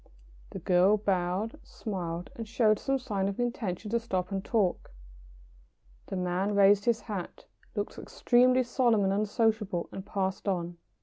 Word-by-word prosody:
] -, -, -25 dB
The -, -, -4 dB
girl 185 Hz, +3 st, +4 dB
bowed, 200 Hz, -, -1 dB
smiled, 175 Hz, -5 st, -5 dB
and 225 Hz, -1 st, -6 dB
showed 215 Hz, -2 st, +3 dB
some 270 Hz, 0 st, 0 dB
sign 205 Hz, -7 st, -2 dB
of 200 Hz, -, -3 dB
an 245 Hz, -, +1 dB
intention 215 Hz, -5 st, -4 dB
to 235 Hz, -, +2 dB
stop 190 Hz, -5 st, -3 dB
and 195 Hz, -1 st, -2 dB
talk. 205 Hz, -5 st, 0 dB, 1.2 s
The -, -, -4 dB
man 185 Hz, +3 st, -1 dB
raised 200 Hz, 0 st, +5 dB
his 230 Hz, -2 st, +2 dB
hat, 205 Hz, -5 st, -6 dB, 0.3 s
looked -, -, -3 dB
extremely 255 Hz, +1 st, +3 dB
solemn 240 Hz, -4 st, +2 dB
and 195 Hz, 0 st, +2 dB
unsociable, 210 Hz, -3 st, 0 dB
and 195 Hz, -, -6 dB
passed 190 Hz, 0 st, -3 dB
on. 175 Hz, -2 st, -2 dB
200 Hz, 160 wpm, -29 LUFS, 185-225 Hz, 1.2 s, raised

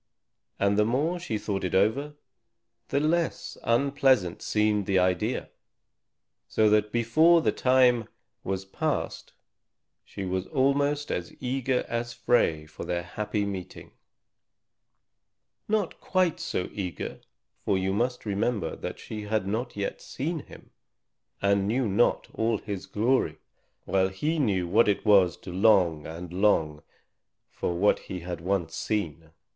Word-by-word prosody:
And 100 Hz, +1 st, +2 dB
the -, -, +6 dB
more 145 Hz, +11 st, 0 dB
she 140 Hz, -11 st, -3 dB
thought 100 Hz, -2 st, -3 dB
it 90 Hz, -, -1 dB
over, 130 Hz, +10 st, +1 dB, 0.7 s
the 140 Hz, -, +1 dB
less 165 Hz, +3 st, 0 dB
unpleasant 130 Hz, -6 st, +2 dB
seemed 105 Hz, -2 st, +1 dB
the 95 Hz, -, +2 dB
idea. 90 Hz, +6 st, 0 dB, 1.0 s
So 110 Hz, -1 st, +3 dB
that 105 Hz, 0 st, +3 dB
before 155 Hz, +9 st, +4 dB
the -, -, +3 dB
time 125 Hz, -3 st, +3 dB, 0.4 s
was 95 Hz, 0 st, -3 dB
passed, 95 Hz, -, -3 dB, 0.7 s
she 100 Hz, -, -7 dB
was 95 Hz, 0 st, -2 dB
almost 145 Hz, +1 st, +1 dB
as 90 Hz, -1 st, -4 dB
eager 130 Hz, 0 st, -1 dB
as 120 Hz, 0 st, -3 dB
Frey 115 Hz, -10 st, +1 dB
for 80 Hz, -, -9 dB
their 85 Hz, 0 st, -2 dB
happy 105 Hz, +3 st, -2 dB
meeting; 95 Hz, -3 st, -7 dB, 1.8 s
not 210 Hz, -4 st, -1 dB
quite 185 Hz, -3 st, +1 dB
so 90 Hz, -, -2 dB
eager, 90 Hz, -4 st, -5 dB, 0.4 s
for 100 Hz, -, +1 dB
you 95 Hz, +1 st, 0 dB
must 125 Hz, +4 st, -1 dB
remember 105 Hz, -4 st, -1 dB
that -, -, -6 dB
she 110 Hz, -1 st, -7 dB
had 105 Hz, -2 st, 0 dB
not 115 Hz, +5 st, -3 dB
yet 100 Hz, -, -3 dB
seen 160 Hz, +5 st, -3 dB
him -, -, -14 dB, 0.7 s
and 100 Hz, 0 st, +3 dB
knew 120 Hz, +3 st, +1 dB
not 105 Hz, +4 st, +2 dB
all 110 Hz, 0 st, +1 dB
his 100 Hz, -2 st, -6 dB
glory, 105 Hz, -5 st, +1 dB, 0.5 s
while 95 Hz, -1 st, +2 dB
he 150 Hz, +12 st, -1 dB
knew 95 Hz, -10 st, +1 dB
what 110 Hz, +6 st, +4 dB
it 105 Hz, +1 st, 0 dB
was 95 Hz, -5 st, +5 dB
to 90 Hz, -, -9 dB
long 90 Hz, -6 st, +3 dB
and 85 Hz, +2 st, -8 dB
long 80 Hz, -6 st, +2 dB, 0.7 s
for 85 Hz, -, -2 dB
what 100 Hz, +4 st, +3 dB
he 90 Hz, -2 st, -7 dB
had 85 Hz, -1 st, -5 dB
once 90 Hz, -2 st, -1 dB
seen. 80 Hz, -7 st, -3 dB
105 Hz, 140 wpm, -27 LUFS, 95-125 Hz, 1.8 s, the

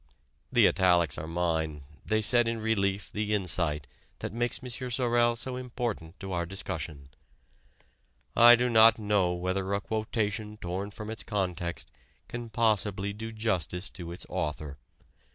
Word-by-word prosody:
The -, -, +6 dB
italics 90 Hz, -5 st, +3 dB
are 80 Hz, -, -6 dB
mine: 80 Hz, -3 st, -1 dB, 0.2 s
they 110 Hz, 0 st, +1 dB
set 120 Hz, +2 st, +4 dB
in 115 Hz, 0 st, -1 dB
relief 100 Hz, -2 st, 0 dB
the 105 Hz, 0 st, 0 dB
insight 85 Hz, -6 st, +1 dB, 0.3 s
that -, -, -5 dB
makes 120 Hz, +2 st, 0 dB
M. 125 Hz, 0 st, -3 dB
Sorel 120 Hz, -1 st, +2 dB
so 125 Hz, +2 st, -3 dB
important 120 Hz, -9 st, -4 dB
to 95 Hz, -1 st, -5 dB
our 85 Hz, -1 st, 0 dB
discussion. 75 Hz, -7 st, -5 dB, 1.3 s
I 120 Hz, +1 st, +9 dB
do 125 Hz, +1 st, +1 dB
not 115 Hz, -1 st, +7 dB
know 105 Hz, -5 st, +1 dB
whether 95 Hz, +2 st, -2 dB
a -, -, 0 dB
quotation 110 Hz, 0 st, -2 dB
torn 95 Hz, +1 st, -4 dB
from 105 Hz, +1 st, -7 dB
its 110 Hz, -, -4 dB
context 90 Hz, -5 st, -3 dB, 0.4 s
can 120 Hz, -1 st, -6 dB
possibly 105 Hz, -3 st, +1 dB
do 110 Hz, +2 st, -6 dB
justice 100 Hz, -5 st, -2 dB
to 85 Hz, -3 st, -8 dB
its 85 Hz, -, -7 dB
author. 75 Hz, -5 st, -4 dB
105 Hz, 145 wpm, -29 LUFS, 90-115 Hz, 1.3 s, I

